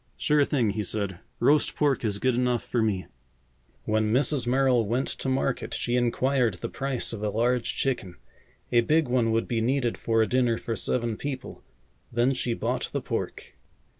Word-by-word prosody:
"Sure 150 Hz, -1 st, +3 dB
thing," 125 Hz, -7 st, +1 dB
he 105 Hz, -, -2 dB
said. 100 Hz, -3 st, -2 dB, 0.2 s
"Roast 150 Hz, +1 st, +3 dB
pork 140 Hz, -5 st, +1 dB
is 105 Hz, -3 st, +1 dB
good 130 Hz, +4 st, +1 dB
enough 125 Hz, -1 st, +1 dB
for 120 Hz, -, -1 dB
me." 100 Hz, -4 st, 0 dB, 0.8 s
When 110 Hz, 0 st, +1 dB
Mrs. 135 Hz, +1 st, +1 dB
Merrill 130 Hz, -2 st, +3 dB
went 125 Hz, +5 st, 0 dB
to 135 Hz, -, -3 dB
market 130 Hz, -1 st, -1 dB
she 120 Hz, -, -1 dB
inquired 125 Hz, -2 st, +1 dB
the 85 Hz, -, -5 dB
price 135 Hz, -3 st, -2 dB
of 110 Hz, -, -5 dB
a 105 Hz, -, 0 dB
large 120 Hz, +3 st, 0 dB
chicken. 115 Hz, -10 st, -2 dB, 0.6 s
A 120 Hz, -, +5 dB
big 155 Hz, +5 st, +2 dB
one 120 Hz, -2 st, +2 dB
would 115 Hz, 0 st, 0 dB
be 115 Hz, -2 st, 0 dB
needed 125 Hz, 0 st, 0 dB
for 115 Hz, -1 st, +2 dB
a -, -, -1 dB
dinner 125 Hz, -1 st, +2 dB
for 115 Hz, -, -4 dB
seven 115 Hz, -1 st, -1 dB
people. 135 Hz, -2 st, -6 dB, 0.5 s
Then 120 Hz, +3 st, +2 dB
she 125 Hz, -2 st, -1 dB
bought -, -, -2 dB
the -, -, -2 dB
pork. -, -, -4 dB
120 Hz, 180 wpm, -26 LUFS, 110-130 Hz, 0.8 s, A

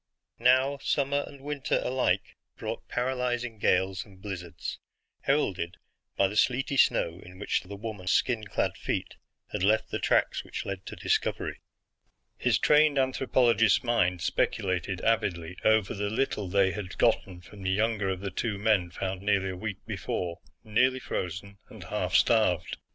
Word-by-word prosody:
Now, 130 Hz, +3 st, +4 dB
summer 140 Hz, 0 st, +1 dB
and 140 Hz, -1 st, -12 dB
winter 145 Hz, -1 st, -1 dB
alike 130 Hz, 0 st, 0 dB, 0.2 s
brought -, -, -5 dB
paralyzing 125 Hz, -2 st, -2 dB
gales 95 Hz, 0 st, +2 dB
and 95 Hz, -2 st, -18 dB
blizzards, 90 Hz, -4 st, -6 dB, 0.4 s
heralded 95 Hz, -, 0 dB, 0.4 s
by 100 Hz, -, +4 dB
the 100 Hz, -, -6 dB
sleety 130 Hz, +4 st, +2 dB
snow 85 Hz, -9 st, +3 dB
in 90 Hz, +1 st, -13 dB
which 100 Hz, -, 0 dB
the 100 Hz, +2 st, -9 dB
woman's 100 Hz, -3 st, -4 dB
skin 115 Hz, -4 st, +1 dB
clad -, -, -1 dB
feet -, -, -3 dB, 0.3 s
had -, -, -3 dB
left 105 Hz, +3 st, +2 dB
the -, -, -1 dB
tracks -, -, +2 dB
which -, -, -6 dB
led 95 Hz, -1 st, -5 dB
to -, -, -6 dB
discovery. -, -, -1 dB, 0.7 s
His -, -, +2 dB
trained 150 Hz, -1 st, +4 dB
anthropologist's 130 Hz, -4 st, +3 dB
mind 90 Hz, -8 st, +1 dB
speculated 95 Hz, -1 st, 0 dB
avidly 90 Hz, -6 st, 0 dB
over 110 Hz, -3 st, +3 dB
the 100 Hz, 0 st, -2 dB
little 110 Hz, -3 st, -1 dB
they 95 Hz, +1 st, +3 dB
had 95 Hz, -2 st, -6 dB
gotten 90 Hz, -3 st, +1 dB
from 95 Hz, +3 st, -13 dB
the 95 Hz, -, -1 dB
younger 105 Hz, 0 st, +1 dB
of 95 Hz, -1 st, -3 dB
the 100 Hz, -1 st, -4 dB
two 105 Hz, +2 st, -2 dB
men 100 Hz, -4 st, +2 dB
found 95 Hz, +1 st, -4 dB
nearly 100 Hz, -1 st, +1 dB
a -, -, -6 dB
week 100 Hz, +1 st, -6 dB
before, 90 Hz, 0 st, -3 dB, 0.2 s
nearly 125 Hz, +4 st, +2 dB
frozen 95 Hz, -1 st, -5 dB
and -, -, -11 dB
half -, -, -2 dB
starved. 110 Hz, -8 st, +3 dB
105 Hz, 155 wpm, -28 LUFS, 95-125 Hz, 0.7 s, Now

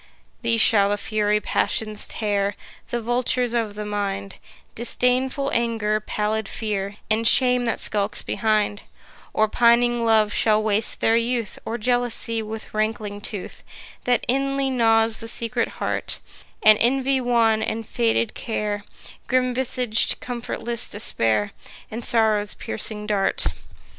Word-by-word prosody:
These 230 Hz, -1 st, +1 dB
shall 200 Hz, -3 st, +5 dB
the 205 Hz, -, 0 dB
fury 210 Hz, 0 st, 0 dB
Passions 215 Hz, 0 st, 0 dB
tear, 205 Hz, -2 st, -1 dB, 0.3 s
The 240 Hz, -1 st, -3 dB
vultures 245 Hz, +1 st, 0 dB
of 225 Hz, -3 st, -1 dB
the 210 Hz, 0 st, -5 dB
mind 200 Hz, -1 st, -3 dB, 0.4 s
Disdainful 255 Hz, +3 st, 0 dB
Anger, 225 Hz, -2 st, 0 dB
pallid 215 Hz, 0 st, -2 dB
Fear, 205 Hz, -2 st, -3 dB, 0.2 s
And 225 Hz, +1 st, +2 dB
Shame 250 Hz, 0 st, +5 dB
that 230 Hz, -, -1 dB
skulks 205 Hz, 0 st, 0 dB
behind; 215 Hz, -2 st, 0 dB, 0.5 s
Or 215 Hz, -, +2 dB
pining 240 Hz, +1 st, +3 dB
Love 220 Hz, -2 st, +3 dB
shall 215 Hz, -1 st, +3 dB
waste 215 Hz, 0 st, 0 dB
their 225 Hz, -, +3 dB
youth, 235 Hz, -3 st, -2 dB
Or 230 Hz, -, -3 dB
Jealousy 240 Hz, -1 st, 0 dB
with 220 Hz, 0 st, -7 dB
rankling 215 Hz, -1 st, -2 dB
tooth, 205 Hz, -2 st, -7 dB, 0.4 s
That 245 Hz, -1 st, +2 dB
inly 275 Hz, +1 st, 0 dB
gnaws 225 Hz, -2 st, +2 dB
the 225 Hz, -, -6 dB
secret 230 Hz, 0 st, 0 dB
heart, -, -, -3 dB, 0.4 s
And 215 Hz, 0 st, +7 dB
Envy 265 Hz, +2 st, +2 dB
wan, 230 Hz, -3 st, +2 dB
and 220 Hz, 0 st, -3 dB
faded 230 Hz, -1 st, 0 dB
Care, 210 Hz, -2 st, -3 dB, 0.4 s
Grim 255 Hz, -1 st, +1 dB
visag'd 250 Hz, -3 st, +1 dB
comfortless 240 Hz, -1 st, -3 dB
Despair, 110 Hz, -, +1 dB, 0.4 s
And 230 Hz, +2 st, -5 dB
Sorrow's 215 Hz, -3 st, +2 dB
piercing 210 Hz, -1 st, -4 dB
dart. 205 Hz, -2 st, 0 dB
225 Hz, 130 wpm, -23 LUFS, 210-240 Hz, 0.5 s, And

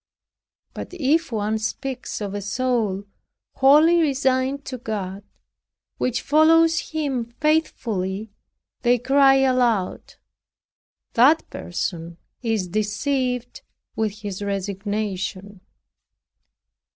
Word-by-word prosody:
But -, -, -7 dB
if 320 Hz, -1 st, +1 dB
one 215 Hz, 0 st, -1 dB
speaks 255 Hz, +3 st, -4 dB
of 200 Hz, -1 st, -4 dB
a 205 Hz, -, -3 dB
soul 215 Hz, -2 st, -1 dB, 0.5 s
wholly 305 Hz, +6 st, +6 dB
resigned 270 Hz, -1 st, 0 dB
to 255 Hz, -2 st, -6 dB
God, 200 Hz, -4 st, -5 dB, 0.8 s
which 245 Hz, -1 st, -1 dB
follows 325 Hz, +2 st, +4 dB
him 280 Hz, -7 st, -2 dB
faithfully, 220 Hz, -10 st, -1 dB, 0.5 s
they 245 Hz, 0 st, +3 dB
cry 270 Hz, +2 st, +4 dB
aloud, 250 Hz, -7 st, +1 dB, 1.0 s
"That 285 Hz, +7 st, +4 dB
person 170 Hz, -1 st, -4 dB, 0.2 s
is 225 Hz, -6 st, -1 dB
deceived 245 Hz, +5 st, -2 dB, 0.3 s
with 215 Hz, -1 st, -2 dB
his 205 Hz, -2 st, -5 dB
resignation." 200 Hz, 0 st, -3 dB
235 Hz, 90 wpm, -23 LUFS, 205-270 Hz, 1.0 s, wholly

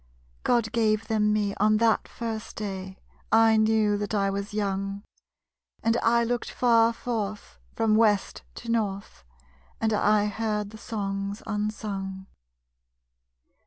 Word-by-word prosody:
_God 230 Hz, -3 st, +2 dB
gave 220 Hz, -1 st, +1 dB
them 210 Hz, -1 st, +2 dB
me 205 Hz, -1 st, +1 dB
on 215 Hz, +1 st, +3 dB
that 225 Hz, 0 st, +2 dB
first 225 Hz, -2 st, -5 dB
day 190 Hz, -2 st, -5 dB, 0.3 s
I 225 Hz, 0 st, +6 dB
knew 215 Hz, -1 st, +3 dB
that 205 Hz, +1 st, -2 dB
I 195 Hz, -1 st, +1 dB
was 200 Hz, +1 st, -4 dB
young. 195 Hz, -1 st, -2 dB, 0.8 s
And 225 Hz, 0 st, +2 dB
I 235 Hz, 0 st, +3 dB
looked 240 Hz, +1 st, -2 dB
far 230 Hz, -2 st, +4 dB
forth, 215 Hz, -, -4 dB, 0.2 s
from 215 Hz, -1 st, +2 dB
west 215 Hz, -3 st, +2 dB
to 235 Hz, -, -5 dB
north; 200 Hz, -4 st, -2 dB, 0.6 s
And 220 Hz, -1 st, +1 dB
I 210 Hz, 0 st, +3 dB
heard 210 Hz, -1 st, -2 dB
the 220 Hz, -, -11 dB
Songs 200 Hz, -1 st, -4 dB
unsung. 205 Hz, -3 st, -4 dB
215 Hz, 125 wpm, -26 LUFS, 200-225 Hz, 0.8 s, I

